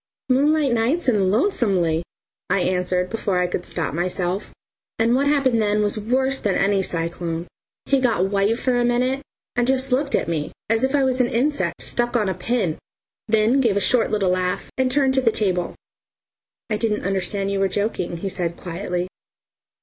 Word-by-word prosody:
"Moonlight 285 +1 +3
nights 250 +9 +1
and 205 -6 +3
lonesomely," 195 - +1 0.5
I 195 - +2
answered 180 0 0
before 210 -4 -1
I 180 - +2
could 180 0 -3
stop 160 -5 -2
myself, 180 +3 -2 0.5
and 230 +1 +2
what 275 +3 +2
happened 270 -5 +2
then 210 0 +2
was 205 - 0
worse 265 +5 0
than 200 -3 0
any 195 0 +2
cyclone. 170 -1 -3 0.4
He 275 - +2
got 230 -8 +2
white 200 +3 +2
for 255 0 0
a 245 - +2
minute 250 +3 +1 0.3
and 245 0 +1
just 265 0 +1
looked 275 +3 +1
at - - 0
me 155 -3 -2 0.2
as 225 +2 +2
if 265 +2 +2
I 280 - +3
was 260 -1 +2
an 240 - +1
insect 285 +5 0
stuck 240 0 -1
on 210 -4 +1
a - - 0
pin, 215 -10 -1 0.5
then 220 +4 +3
gave 220 -6 +2
a - - +4
short 230 +3 +2
little 200 -4 +1
laugh 180 +1 -1
and 260 -1 +1
turned 270 0 +2
to 265 - +2
the 230 -3 +3
table. 185 -5 -1 0.9
"I 215 - -1
didn't 210 -1 -1
understand 195 +1 -1
you 200 - -1
were 195 - +3
joking," 190 -3 -2
he 195 +3 -3
said 170 -2 -2
quietly. 180 0 -3
215 Hz, 185 wpm, -22 LUFS, 185-255 Hz, 0.9 s, a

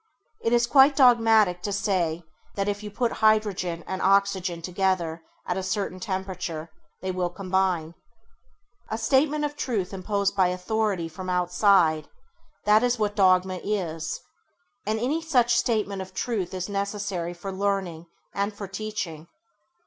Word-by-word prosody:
It 230 - 0
is 240 0 +4
quite 270 +3 +6
dogmatic 225 -8 +5
to 205 - -3
say 185 -5 0 0.3
that 200 0 -1
if 205 0 -2
you 210 - -6
put 230 +3 -1
hydrogen 205 -6 +2
and 190 - -4
oxygen 190 -3 +2
together 180 -3 -1 0.2
at 180 - -2
a - - -1
certain 190 0 -2
temperature 185 -4 -4 0.3
they 190 - -1
will 180 -1 -1
combine. 185 -3 -1 1.0
A 220 - -2
statement 285 +6 +2
of 290 0 -4
truth 205 -10 -2
imposed 200 +1 -1
by 190 -2 +4
authority 185 0 -1
from 185 +3 -7
outside, 180 -3 +3 0.6
that 210 +1 +5
is 245 0 +1
what 210 -1 -1
dogma 185 -1 +3
is, 165 -6 -2 0.7
and 220 +1 0
any 280 +8 0
such 250 -7 +3
statement 210 -6 0
of 185 0 -9
truth 200 -7 -2
is 185 -1 -3
necessary 200 -3 -3
for 195 +3 -6
learning 190 -4 -2 0.3
and 200 +1 -2
for 200 -1 -6
teaching. 190 -6 -5
195 Hz, 145 wpm, -25 LUFS, 180-215 Hz, 1.0 s, quite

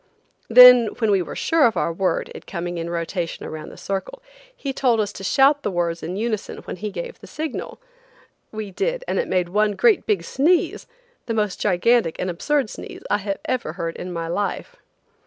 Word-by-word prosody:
Then 250 0 +9
when 220 -3 +1
we 195 -2 +3
were - - -6
sure 325 -5 +3
of 225 - -2
our 170 - 0
word, 450 - -1
it - - -11
coming 175 -1 -4
in 165 0 -4
rotation 170 0 -3
around 155 -1 -7
the - - -13
circle, 195 - -4 0.4
he 275 -2 -4
told 245 -4 +2
us 205 -1 -1
to - - -9
shout 275 +8 +4
the - - -2
words 170 -2 -1
in 175 +3 -5
unison 215 0 -3
when - - -7
he 210 +3 -4
gave 485 - -7
the - - -13
signal. 310 -3 -5 0.7
We 215 -2 -6
did, - - -2
and - - 0
it 485 - -1
made 180 -2 0
one 210 +2 +2
great 435 - +3
big 200 -6 +1
sneeze–the 365 - -1
most 210 -3 -1
gigantic 205 -1 +2
and 185 - -2
absurd 270 +7 0
sneeze - - -9
I 200 -1 0
ever 255 -11 -2
heard 165 -1 -4
in 180 - -6
my 165 -1 -4
life. 205 - -3
210 Hz, 195 wpm, -22 LUFS, 175-270 Hz, 0.7 s, Then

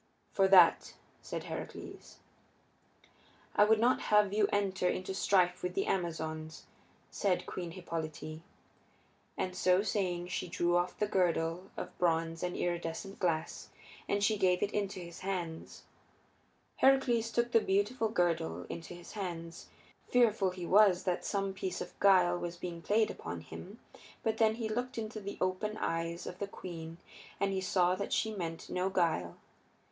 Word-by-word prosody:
"For 195 -1 +3
that," 185 -3 +6 0.3
said - - -5
Heracles. - - -8 1.4
"I - - +7
would 220 +1 +5
not 245 +3 +3
have 210 -2 +4
you 210 -1 +3
enter 190 -3 +1
into 185 +1 -3
strife 180 -2 +2
with 180 0 -3
the 195 - +1
Amazons," 160 -3 -3 0.5
said 190 -3 0
Queen 175 -2 -5
Hippolyte. 160 -3 -5 1.0
And 185 0 -2
so 185 +1 +3
saying 180 -5 -1
she 180 - -3
drew 175 0 +1
off 175 +1 0
the 210 - +1
girdle 180 -1 0
of - - -6
bronze 165 -2 +1
and 180 0 -2
iridescent 175 +3 -3
glass, 165 -3 -1 0.4
and 200 0 +1
she 210 0 +2
gave 180 -1 +3
it 205 - 0
into 200 -2 -2
his 170 -1 -9
hands. 175 -4 -5 0.9
Heracles 255 -4 +4
took 235 +1 0
the 230 - +5
beautiful 215 +4 +1
girdle 165 - 0
into 170 +1 -7
his 175 - -11
hands. 170 -5 -6 0.4
Fearful 225 -5 +3
he 180 -1 -6
was 195 -1 +5
that 180 -2 -1
some 195 -1 -1
piece 190 -1 -4
of - - -6
guile 180 -3 +5
was 175 0 -5
being 170 -1 -6
played 215 +5 +2
upon 85 -1 -6
him, 195 - -10 0.4
but 220 0 0
then 220 -1 +3
he 230 -1 -3
looked 245 +4 -3
into 220 -1 -4
the 200 0 -6
open 185 +4 -1
eyes 165 -1 -2
of 180 - -7
the 200 - -2
queen 165 -4 -8 0.4
and 200 0 +1
he 190 - -1
saw 180 -1 +2
that 200 +2 -3
she 220 -1 +1
meant 165 -5 -5
no 180 +1 -1
guile. 165 - 0
185 Hz, 155 wpm, -32 LUFS, 170-205 Hz, 1.4 s, I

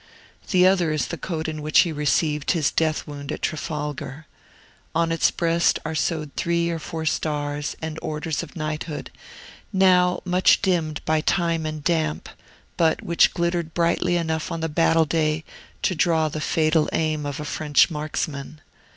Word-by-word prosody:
The 180 -2 +5
other 185 -4 +3
is 155 -2 -1
the - - -3
coat 160 -3 -3
in 155 -1 -4
which 155 +1 +5
he 170 - 0
received 150 0 +1
his 160 -5 +1
death 155 -1 0
wound 145 -2 -7
at - - -6
Trafalgar. 150 -2 -4 0.7
On 165 0 +2
its 165 - +3
breast 170 0 +2
are 160 - -2
sewed 155 -1 -2
three 170 0 0
or 165 - -3
four 160 0 -5
stars 145 -2 -2
and 160 0 -4
orders 155 0 -3
of - - -10
knighthood, 155 -1 -4 0.6
now 180 -2 +4
much 180 +1 +4
dimmed 165 -5 0
by 155 0 +2
time 165 -1 0
and 155 -1 -5
damp, 160 -2 0 0.5
but 160 -2 +2
which 170 - +3
glittered 170 -2 -1
brightly 175 +1 +2
enough 160 -2 -2
on 165 - -3
the 160 - -1
battle 165 +1 +3
day 155 0 0 0.4
to - - +2
draw 160 -2 +2
the 155 +1 -5
fatal 155 0 +2
aim 155 -2 0
of 145 0 -4
a 150 - -5
French 150 +2 +2
marksman. 150 -1 -4
160 Hz, 165 wpm, -23 LUFS, 150-170 Hz, 0.7 s, The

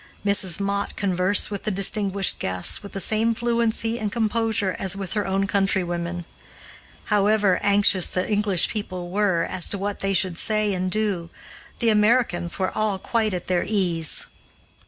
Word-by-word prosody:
Mrs. 200 -3 +2
Mott 200 0 -2
conversed 190 +1 +1
with 200 - -4
the - - -2
distinguished 200 0 0
guests 95 -1 0
with 200 - -11
the 195 - -4
same 220 +3 +2
fluency 230 0 0
and 210 -2 -3
composure 220 -4 0
as 190 0 0
with 195 -2 -5
her 210 -2 -1
own 195 +1 0
countrywomen. 175 -3 -1 0.9
However 205 -2 +3
anxious 200 -3 +3
the 185 - -2
English 205 -4 +2
people 185 -4 -5
were 190 -4 +1
as 180 0 -1
to 200 - -2
what 200 +1 -4
they 195 0 0
should 180 -2 0
say 215 -2 +1
and 185 0 -2
do, 195 -5 -1 0.5
the 230 - +2
Americans 210 -5 +2
were 185 -1 -1
all 215 -2 -1
quite 215 0 -1
at 180 - -5
their 180 -1 0
ease. 175 -7 +1
200 Hz, 160 wpm, -23 LUFS, 185-215 Hz, 0.9 s, However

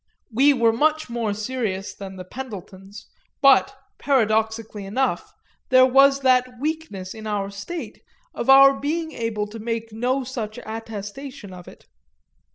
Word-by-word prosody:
We 275 +6 +5
were 235 -4 +3
much 310 +2 +1
more 230 -3 -1
serious 210 -2 -3
than 195 -1 -9
the 185 -1 -9
Pendletons, 200 -4 -9 0.3
but, 275 -2 +4 0.2
paradoxically 220 -4 0
enough, 255 +7 -1 0.4
there 255 0 +7
was 275 +2 +5
that 255 -2 +2
weakness 295 -11 -4
in 220 -1 -8
our 200 -2 -2
state 200 +13 -7 0.3
of - - -4
our 275 0 +8
being 320 +3 -2
able 225 -5 -3
to 215 +2 -10
make 230 0 -4
no 250 +4 0
such 230 -4 -5
attestation 220 +1 -7
of 180 -1 -12
it. - - -15
230 Hz, 140 wpm, -23 LUFS, 210-270 Hz, 0.4 s, our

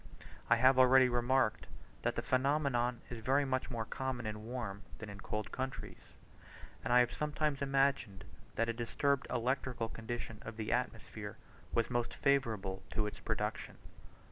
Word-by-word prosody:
I - - +7
have 130 +2 +5
already 130 0 +7
remarked 120 -1 +2 0.3
that - - 0
the - - -2
phenomenon 130 -3 +1
is 120 - -4
very 135 +5 +2
much 130 -1 -1
more 115 -3 -2
common 130 0 -3
in 105 0 -4
warm 115 -5 -4 0.2
than 110 -2 -7
in 100 0 -9
cold 105 0 -3
countries; 130 0 -6 0.7
and 115 - -2
I 125 0 +8
have 120 - +1
sometimes 150 -1 -1
imagined 135 -7 +1 0.3
that 115 - +1
a 115 - 0
disturbed 135 +4 0
electrical 125 -1 -1
condition 115 -1 -5
of 115 -1 -8
the 110 -1 -2
atmosphere 110 -4 -3 0.4
was 115 +1 +1
most 120 -1 -1
favourable 110 -9 +1
to 105 - +1
its 105 - -5
production. - - -3
120 Hz, 155 wpm, -35 LUFS, 110-130 Hz, 0.7 s, I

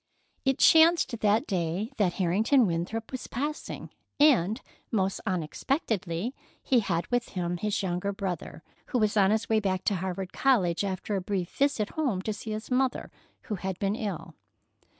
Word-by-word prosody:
It 270 -1 +2
chanced 320 -7 +5
that 215 +1 +3
day 185 - -2
that 190 -5 +2
Harrington 210 +9 +3
Winthrop 185 +6 -2
was 260 - -5
passing, 295 +5 -4 0.3
and, 230 - +4 0.3
most 195 -3 0
unexpectedly, 185 - -1 0.3
he 255 - +3
had 175 -6 -1
with 245 -1 0
him 175 0 -1
his 210 +2 -1
younger 180 +2 -1
brother, 185 -5 -5 0.2
who - - -1
was 215 -2 +2
on 195 -2 +5
his 220 +1 +1
way 220 -1 +3
back 190 -3 -1
to 200 - +1
Harvard 185 +1 -4
College, 200 -11 +2
after 195 +1 -2
a 195 - -1
brief 185 -2 -2
visit 275 -7 +1
home 250 -12 -1
to 215 - -1
see 215 +2 -8
his 215 +3 -5
mother, 255 0 0 0.3
who - - -5
had 190 0 -4
been 200 0 0
ill. 205 -7 -5
205 Hz, 165 wpm, -28 LUFS, 185-235 Hz, 0.3 s, chanced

